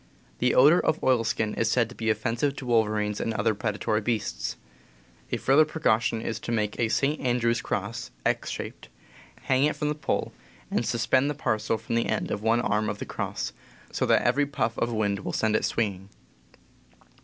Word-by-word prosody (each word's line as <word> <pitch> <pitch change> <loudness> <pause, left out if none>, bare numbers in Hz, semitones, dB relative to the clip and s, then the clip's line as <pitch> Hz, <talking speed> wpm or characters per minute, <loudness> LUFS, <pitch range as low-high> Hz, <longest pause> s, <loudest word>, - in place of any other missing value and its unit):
The 125 - +2
odor 150 +7 +7
of 155 - +2
oilskin 115 -3 +1
is 115 - 0
said 120 -1 +2
to 120 - -11
be 110 -1 -2
offensive 115 +6 0
to 135 - -7
wolverines 105 -3 +1
and 115 - -2
other 110 0 +2
predatory 105 0 -1
beasts. 100 - -2 0.7
A - - +1
further 140 +4 +5
precaution 115 -8 0
is 110 -1 -3
to 120 - -5
make 105 -2 -1
a 115 - +2
St. 145 +6 +1
Andrew's 120 -2 +1
cross 105 +3 -3 0.2
(X - - 0
shaped), - - -7 0.5
hang 130 +1 +3
it 150 - +1
from 150 - -1
the - - +1
pole, 150 - -2 0.4
and - - +1
suspend 130 +4 +2
the 145 - -2
parcel 110 -5 0
from 110 +1 -6
the 115 0 +1
end 110 - -1
of - - -2
one 115 +2 +2
arm 105 -1 0
of 105 - -3
the - - -5
cross, - - -4 0.4
so - - -1
that - - +4
every 145 0 +2
puff 115 -5 -1
of 120 - 0
wind 105 -3 0
will - - -5
set 110 -1 +1
it - - +1
swinging. 100 -4 -2
115 Hz, 190 wpm, -27 LUFS, 110-125 Hz, 0.7 s, odor